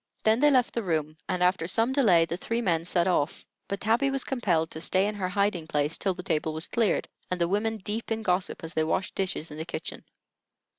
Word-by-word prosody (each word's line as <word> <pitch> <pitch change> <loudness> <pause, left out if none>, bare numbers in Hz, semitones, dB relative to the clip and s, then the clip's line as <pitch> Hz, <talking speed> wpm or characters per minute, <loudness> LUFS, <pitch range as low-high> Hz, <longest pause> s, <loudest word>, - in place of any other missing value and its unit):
Then 220 +2 +4
they 295 +2 +6
left 255 -4 +3
the 235 - -1
room, 155 -5 -1
and 180 0 +1
after 180 -2 +2
some 225 +7 +1
delay 195 -12 +5
the 165 - -3
three 230 +6 -2
men 170 -7 +1
set 175 -1 +1
off; 170 -5 0 0.2
but 200 - -3
Tabby 230 +7 +2
was 270 -1 -1
compelled 175 -11 0
to 160 - -6
stay 185 +3 +3
in 210 - -1
her 190 -3 -2
hiding 200 -4 0
place 150 +1 0
till 190 -2 0
the 180 - -7
table 155 -2 0
was 160 +2 -2
cleared, 230 -4 +1 0.2
and 180 - -2
the 170 - +2
women 215 +4 0
deep 215 +3 -4
in 225 0 -1
gossip, 180 -3 -1
as 165 +1 -5
they 160 - +1
washed 170 +4 -1
dishes 180 -5 -3
in 150 - -8
the - - -2
kitchen. - - -6
185 Hz, 235 wpm, -27 LUFS, 165-220 Hz, 0.2 s, they